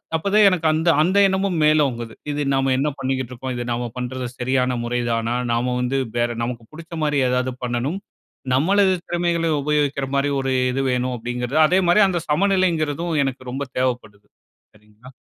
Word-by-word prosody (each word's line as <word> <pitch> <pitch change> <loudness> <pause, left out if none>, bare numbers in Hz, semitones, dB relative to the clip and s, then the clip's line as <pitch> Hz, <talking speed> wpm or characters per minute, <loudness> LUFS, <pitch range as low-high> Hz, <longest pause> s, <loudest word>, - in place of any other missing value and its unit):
அப்பதான் 200 +6 +3
எனக்கு 175 -4 0
அந்த 160 +2 +1
அந்த 185 +5 +2
எண்ணமும் 190 -2 0
மேலோங்குது. 135 -7 +1 0.2
இது 145 0 -2
"நாம 135 0 +1
என்ன 145 +3 +1
பண்ணிக்கிட்டு 130 -2 -2
இருக்கோம்? 130 +1 -5
இது 120 - -3
நாம 120 0 -2
பண்றது, 125 0 -4
சரியான 125 0 0
முறைதானா? 120 -1 -1 0.2
நாம 120 +2 0
வந்து, 125 +2 -1 0.2
வேற 120 0 +1
நமக்கு 120 -1 -4
புடிச்சமாரி 155 -2 -2
ஏதாவது 125 0 0
பண்ணணும். 125 +9 -2 0.5
நம்மளது 190 +8 +3
திறமைகள 170 -1 0
உபயோகிக்கிற 145 -2 0
மாரி 140 +1 +1
ஒரு 135 0 -1 0.2
இது 135 +2 -1
வேணும்" 125 0 -1
அப்பிடிங்கிறது, 125 +3 -3
அதேமாரி 180 +3 +3
அந்த 175 -3 -1
சமநிலைங்கிறதும் 170 -2 +1
எனக்கு 130 -1 -5
ரொம்ப 140 +2 -3
தேவைப்படுது. 120 -5 -3 0.5
சரிங்களா? 105 +4 -17
135 Hz, 150 wpm, -21 LUFS, 125-165 Hz, 0.5 s, அப்பதான்